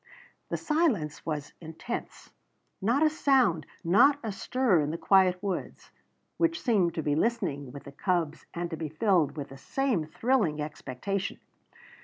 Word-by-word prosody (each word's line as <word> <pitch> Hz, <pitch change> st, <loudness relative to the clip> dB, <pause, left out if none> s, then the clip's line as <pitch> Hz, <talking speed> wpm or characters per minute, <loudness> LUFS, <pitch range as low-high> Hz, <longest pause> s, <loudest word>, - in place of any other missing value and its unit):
The -, -, -1 dB
silence 250 Hz, -, 0 dB
was 150 Hz, -2 st, -3 dB
intense; 165 Hz, +9 st, -7 dB, 0.5 s
not 240 Hz, +9 st, +2 dB
a 310 Hz, -, +5 dB
sound, 260 Hz, -, +2 dB, 0.2 s
not 205 Hz, -, +5 dB
a 220 Hz, -, -2 dB
stir 220 Hz, -1 st, +1 dB
in 145 Hz, -1 st, 0 dB
the 165 Hz, -, -3 dB
quiet 185 Hz, 0 st, +4 dB
woods, 195 Hz, -3 st, -4 dB, 0.5 s
which 330 Hz, -1 st, +1 dB
seemed 200 Hz, -, +2 dB
to 160 Hz, -, -2 dB
be 145 Hz, -, +1 dB
listening 150 Hz, -, -1 dB
with 140 Hz, -, -9 dB
the 140 Hz, -, -10 dB
cubs 165 Hz, 0 st, -1 dB
and 170 Hz, 0 st, -4 dB
to -, -, -2 dB
be 155 Hz, -1 st, -4 dB
filled 160 Hz, -2 st, +1 dB
with 145 Hz, -, -5 dB
the 135 Hz, -, -11 dB
same 245 Hz, -, -1 dB
thrilling 200 Hz, -, +1 dB
expectation. 155 Hz, +6 st, -4 dB
180 Hz, 155 wpm, -28 LUFS, 155-235 Hz, 0.5 s, a